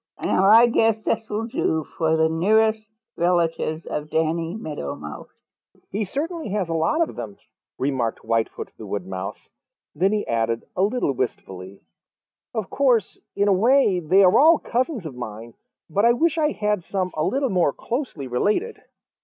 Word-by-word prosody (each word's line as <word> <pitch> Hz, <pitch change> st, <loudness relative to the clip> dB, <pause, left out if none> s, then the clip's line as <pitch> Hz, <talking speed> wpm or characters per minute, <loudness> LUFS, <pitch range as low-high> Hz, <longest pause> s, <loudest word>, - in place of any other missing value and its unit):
Now 190 Hz, -, +1 dB
I 225 Hz, +4 st, +8 dB
guess 225 Hz, -2 st, +2 dB
this 220 Hz, 0 st, -2 dB
will 215 Hz, +2 st, -2 dB
do 160 Hz, -8 st, -1 dB
for 160 Hz, -1 st, +1 dB
the 160 Hz, 0 st, +3 dB
nearest 215 Hz, +6 st, +2 dB, 0.3 s
relatives 170 Hz, -2 st, 0 dB
of 150 Hz, 0 st, -4 dB
Danny 165 Hz, +2 st, -1 dB
Meadow 150 Hz, -, -5 dB
Mouse." 75 Hz, 0 st, -9 dB, 0.6 s
"He 210 Hz, +2 st, -1 dB
certainly 315 Hz, -, -4 dB
has 195 Hz, -3 st, -2 dB
a -, -, -1 dB
lot 170 Hz, -, +1 dB
of -, -, -10 dB
them," 110 Hz, -4 st, -7 dB, 0.4 s
remarked 130 Hz, -4 st, -2 dB
Whitefoot 115 Hz, 0 st, -2 dB
the -, -, -8 dB
Wood 100 Hz, -3 st, -4 dB
Mouse. 95 Hz, 0 st, -7 dB, 0.4 s
Then 185 Hz, +6 st, +1 dB
he 215 Hz, -1 st, -1 dB
added 115 Hz, 0 st, -1 dB
a 185 Hz, -, 0 dB
little 205 Hz, -, +1 dB
wistfully, 95 Hz, -7 st, -5 dB, 0.7 s
"Of 220 Hz, -4 st, -4 dB
course, 245 Hz, -8 st, +1 dB, 0.2 s
in 200 Hz, -, +2 dB
a 200 Hz, -, +5 dB
way 220 Hz, -1 st, +3 dB
they 180 Hz, +4 st, +4 dB
are 185 Hz, +4 st, +5 dB
all 320 Hz, +3 st, +7 dB
cousins 250 Hz, -, -2 dB
of 155 Hz, -, -6 dB
mine, 115 Hz, -1 st, -8 dB, 0.3 s
but 200 Hz, +5 st, 0 dB
I 235 Hz, +1 st, +6 dB
wish 320 Hz, +6 st, +1 dB
I 305 Hz, -1 st, +2 dB
had 210 Hz, -6 st, -1 dB
some 185 Hz, -1 st, -2 dB
a 155 Hz, -, -1 dB
little 270 Hz, -, 0 dB
more 180 Hz, -6 st, +2 dB
closely 235 Hz, -, -4 dB
related." 205 Hz, -, -1 dB
185 Hz, 170 wpm, -23 LUFS, 145-225 Hz, 0.7 s, I